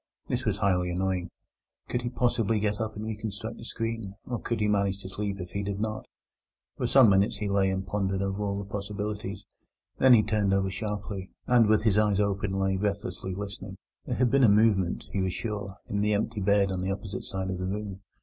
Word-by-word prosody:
This - - -1
was - - +1
highly 90 -3 +2
annoying. 90 0 -1 0.6
Could 120 - -1
he 120 - -2
possibly 115 -3 +1
get 105 0 0
up 110 -1 -3
and 105 +1 -5
reconstruct 110 +1 -4
the - - -10
screen? 115 -4 -4
or 120 -2 -3
could 115 - -2
he 105 - +2
manage 100 -2 +2
to 95 - -6
sleep 100 0 -3
if 90 -1 -6
he 100 - -2
did 100 0 -3
not? 110 0 -3 0.7
For - - -1
some 130 -6 +7
minutes 100 +3 +3
he 105 0 -3
lay 100 -1 +2
and 95 0 -2
pondered 95 -2 -1
over 100 +1 -1
the 100 -1 -5
possibilities; 100 0 -4 0.5
then 130 -2 +8
he 110 - +5
turned 105 -2 +2
over 95 -1 +1
sharply, 100 -1 -4 0.2
and 120 -3 +5
with 110 0 +4
his 105 -2 +4
eyes 105 -2 +3
open 100 -1 0
lay 95 0 +1
breathlessly 100 -1 -2
listening. 100 -1 -6 0.3
There - - -1
had 125 -2 +2
been 135 +1 +4
a 115 - +7
movement, 100 -4 +3
he 95 - 0
was 95 -1 0
sure, 105 -4 -4
in 100 0 -1
the 105 0 +2
empty 110 0 -1
bed 100 0 +3
on 95 -1 -2
the 95 - -1
opposite 95 0 -5
side 95 -1 -3
of 90 - -4
the 95 - -2
room. 100 -1 -4
100 Hz, 215 wpm, -28 LUFS, 95-110 Hz, 0.7 s, then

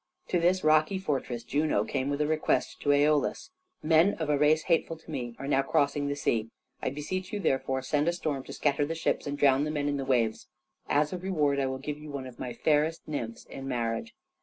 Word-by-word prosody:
To 180 - +2
this 180 +2 +2
rocky 155 +4 +4
fortress 135 -9 -2
Juno 150 +5 +1
came 135 0 -2
with 145 +1 -1
a - - +3
request 155 0 0
to 145 - -1
Æolus. 145 - +2 0.3
"Men 165 +5 +4
of 155 -2 -2
a 145 - +3
race 155 +1 +4
hateful 165 -1 +1
to 160 - -13
me 120 -5 -4
are 135 - -6
now 135 -1 +3
crossing 140 +1 +1
the 145 - -1
sea. 115 -5 0 0.3
I - - 0
beseech 180 +7 -4
you, 210 - -2
therefore, 135 -6 0
send 150 +1 +1
a 170 - +3
storm 150 -6 -3
to - - -8
scatter 145 -1 +1
the 160 +3 -2
ships 160 - -1
and 145 0 -3
drown 140 -1 +4
the 150 - -1
men 145 -2 -1
in 145 0 0
the 135 - -2
waves. 120 -4 0 0.4
As 150 +2 +2
a 180 - -3
reward 150 -7 +1
I 135 - +1
will 130 0 -3
give 145 +2 -5
you 150 0 -10
one 140 -2 -5
of 125 -2 -11
my 125 - -4
fairest 155 +6 +1
nymphs 115 -7 -5
in 135 0 -8
marriage." 125 - -2
145 Hz, 230 wpm, -29 LUFS, 135-155 Hz, 0.4 s, rocky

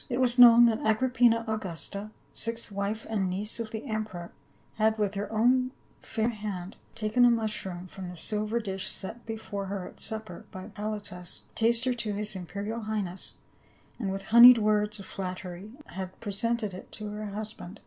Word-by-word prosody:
It 245 0 -1
was 250 -1 +2
known 240 -1 +10
that 225 -2 +3
Agrippina 230 0 +3
Augusta,* 200 -1 -4 0.2
sixth 230 -1 -1
wife 200 +2 -2
and 200 -4 0
niece 205 +5 -1
of 230 -1 -3
the 220 0 -6
emperor, 215 -6 -4 0.5
had 220 0 +3
with 205 -2 0
her 200 +1 -4
own 255 +4 +3 0.3
fair 225 0 -1
hand 205 -4 -5 0.2
taken 225 +2 +2
a 245 - +8
mushroom 215 -6 -1
from 185 0 -8
the 180 - -9
silver 215 +5 0
dish 195 -3 -3
set 225 +5 -6
before 215 -3 -4
her 195 -1 -4
at - - -13
supper 220 -5 -4
by 190 +3 -8
Halotus, 205 -4 -4
taster 235 +2 +3
to 230 -3 -3
his 210 0 -1
imperial 200 +5 -4
high 215 -1 -1
ness, 185 0 -5 0.6
and 200 -5 -1
with 195 0 -4
honeyed 235 +4 +9
words 210 -1 +2
of 195 - -8
flattery 185 +2 -6
had 185 0 -7
presented 215 0 -1
it 185 - -10
to 210 -1 -5
her 210 0 -5
husband. 210 -1 -7
215 Hz, 170 wpm, -29 LUFS, 195-225 Hz, 0.6 s, known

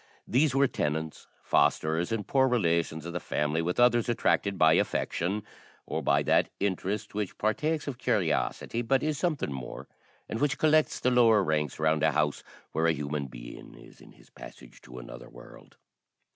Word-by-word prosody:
These 135 +2 +2
were 140 +1 +4
tenants, 80 - -3 0.2
fosterers, 80 +4 +1
and 110 -3 -2
poor 130 -1 +3
relations 85 - 0
of 85 - -6
the 90 - -2
family, 75 0 -1
with 90 +5 -2
others 120 -1 +4
attracted 100 -4 +1
by 80 0 +5
affection, 95 +7 -1 0.4
or - - -3
by - - +2
that - - +2
interest 100 +2 -2
which 105 -2 -4
partakes 150 +9 -1
of 130 -4 -5
curiosity, 115 - -1
but 130 +3 +1
is 150 -2 -1
something 155 - -1
more, 65 -3 -7 0.4
and 110 - -4
which 145 -2 +1
collects 155 0 +2
the 125 - +1
lower 115 -4 +5
ranks 75 -4 -1
round 80 0 +1
a 80 -1 +3
house 75 -2 0 0.3
where 80 +2 +1
a 85 - +3
human 70 -1 -3
being - - -11
is - - -16
in - - -16
his - - -22
passage 60 - -13
to 65 0 -12
another - - -10
world. - - -15
95 Hz, 170 wpm, -28 LUFS, 80-120 Hz, 0.4 s, by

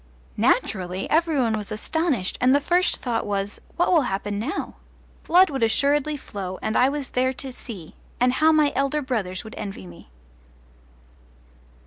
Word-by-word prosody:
Naturally 185 -1 +1
every 320 -1 +2
one 230 -3 +2
was 210 0 -5
astonished, 270 - -1
and 255 +2 +5
the - - +4
first 355 +5 +1
thought 240 -3 -2
was, 200 0 -3
What 350 - +2
will 330 - +5
happen 200 +1 -3
now? 230 +7 -4 0.5
Blood 360 0 +5
would 270 -3 -3
assuredly 285 +6 +2
flow, 190 -7 -6
and 220 - -1
I 255 - +5
was 285 -2 -4
there 260 +1 +1
to 265 0 -8
see 195 -11 -9 0.3
and 250 +1 +3
how 315 +4 +4
my 305 -2 +3
elder 275 +2 0
brothers 205 -8 -2
would 220 - -10
envy 195 - -6
me! 85 -7 -14
250 Hz, 160 wpm, -24 LUFS, 205-295 Hz, 0.5 s, and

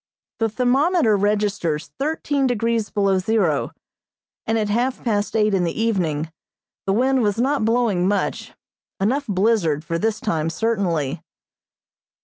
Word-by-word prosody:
The 225 -1 +1
thermometer 255 - +2
registers 200 -6 0
thirteen 285 -2 0
degrees 230 -2 0
below 195 -2 +1
zero, 185 -7 +1 0.8
and 225 - +1
at 215 -1 0
half 245 +5 -1
past 210 -3 -1
eight 215 -1 +2
in 190 -2 +2
the 170 +3 -2
evening 165 -9 0 0.6
the 195 - +2
wind 260 +4 +2
was 205 -2 +1
not 265 0 +1
blowing 225 -6 +2
much; 200 0 -1 0.5
enough 260 +9 0
blizzard 185 -7 +1
for 165 0 -2
this 220 +1 0
time 165 -7 -1
certainly. 170 -6 -1
210 Hz, 130 wpm, -21 LUFS, 185-235 Hz, 0.8 s, thermometer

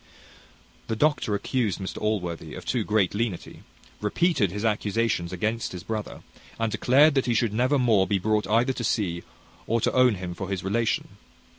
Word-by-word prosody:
The 110 - -1
doctor 145 -4 +1
accused 110 0 -1
Mr 95 -1 -5
Allworthy 90 -7 -2
of - - -9
too 125 -3 0
great 105 -3 +1
lenity, 105 -4 -3 0.4
repeated 110 - +1
his 105 +5 -4
accusations 105 -4 0
against 110 +5 -2
his 90 -2 -7
brother, 110 0 -5 0.4
and 115 -1 0
declared 140 +8 +4
that 135 -2 +1
he 120 - +1
should 115 -2 +1
never 130 +6 +2
more 110 -7 +3
be 100 - +1
brought 105 +2 0
either 115 +5 +2
to 120 - -5
see, 90 -6 -1 0.5
or 115 +1 +1
to - - 0
own 125 -3 +4
him 90 -1 -5
for 95 +2 -6
his 95 -2 -3
relation. 110 +4 0
110 Hz, 175 wpm, -26 LUFS, 95-120 Hz, 0.5 s, declared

